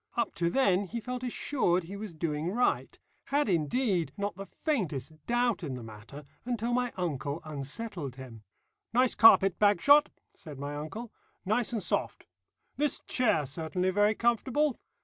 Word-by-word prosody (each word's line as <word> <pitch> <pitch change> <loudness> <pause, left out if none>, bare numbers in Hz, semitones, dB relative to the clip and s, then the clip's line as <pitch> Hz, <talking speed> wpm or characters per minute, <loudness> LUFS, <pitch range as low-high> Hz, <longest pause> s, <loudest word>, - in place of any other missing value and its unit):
Up 235 -3 0
to 170 +2 0
then 200 -4 +2
he 235 +5 -5
felt 250 +2 -5
assured 230 -7 0
he 185 +4 -8
was 200 -4 -7
doing 155 0 -2
right; 245 +6 0 0.3
had, 290 +1 +1
indeed, 180 - +1
not 200 -2 -2
the 195 +1 -8
faintest 165 - -2
doubt 240 -4 +1
in 140 -5 -3
the 125 - -7
matter 115 +7 -11 0.2
until 240 -1 -2
my 245 0 +1
uncle 150 -4 -2
unsettled 150 - -5
him. 125 -4 -10 0.5
"Nice 250 +1 +3
carpet, 195 -4 +6
Bagshot," 285 +9 +5 0.2
said 150 -4 -11
my 145 +1 -5
uncle, 210 +11 -6 0.3
"nice 215 +5 +1
and 225 -4 -2
soft. - - -2 0.5
This 295 -1 0
chair 215 - +2
certainly 165 +6 -2
very 205 +3 +3
comfortable. 250 +5 +1
195 Hz, 150 wpm, -30 LUFS, 155-240 Hz, 0.5 s, carpet